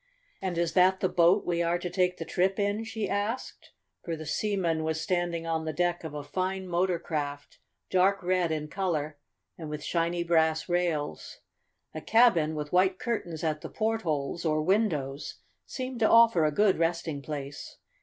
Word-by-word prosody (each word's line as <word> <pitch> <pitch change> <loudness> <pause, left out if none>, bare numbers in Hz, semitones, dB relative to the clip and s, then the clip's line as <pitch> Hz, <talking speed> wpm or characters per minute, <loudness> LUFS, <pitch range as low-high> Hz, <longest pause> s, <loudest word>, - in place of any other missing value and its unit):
"And 185 -3 -2
is 170 -1 0
that 185 +1 +4
the 185 - +2
boat 180 +2 +3
we 170 -1 0
are 170 +1 +1
to 180 - -5
take 180 0 +1
the 165 - -5
trip 190 +3 0
in?" 205 +2 0
she 225 -1 -3
asked, 205 +5 -3 0.3
for 170 - -3
the 155 0 -8
seaman 170 -2 0
was 160 0 -1
standing 175 -1 -1
on 165 -1 -1
the 160 0 -3
deck 175 +2 0
of 155 -2 -6
a 145 - -5
fine 185 +4 -3
motor 175 0 +1
craft, 145 -4 -5 0.3
dark 190 +1 +3
red 180 -2 +1
in 155 -1 -2
color, 155 -5 -2 0.4
and 160 -2 -6
with 150 -1 -5
shiny 170 +1 0
brass 160 -2 +2
rails. 175 -4 -2 0.6
A 155 - -6
cabin, 190 -10 +4
with 150 +1 -5
white 185 +1 +3
curtains 175 -10 -3
at 155 -2 -1
the - - -7
portholes, 170 -9 -2
or 155 -2 +1
windows, 155 -8 0 0.3
seemed 255 -2 -5
to 220 - +4
offer 230 -8 +6
a 150 - +2
good 195 +2 +3
resting 165 -3 -1
place. 145 -1 -7
170 Hz, 175 wpm, -28 LUFS, 155-190 Hz, 0.6 s, offer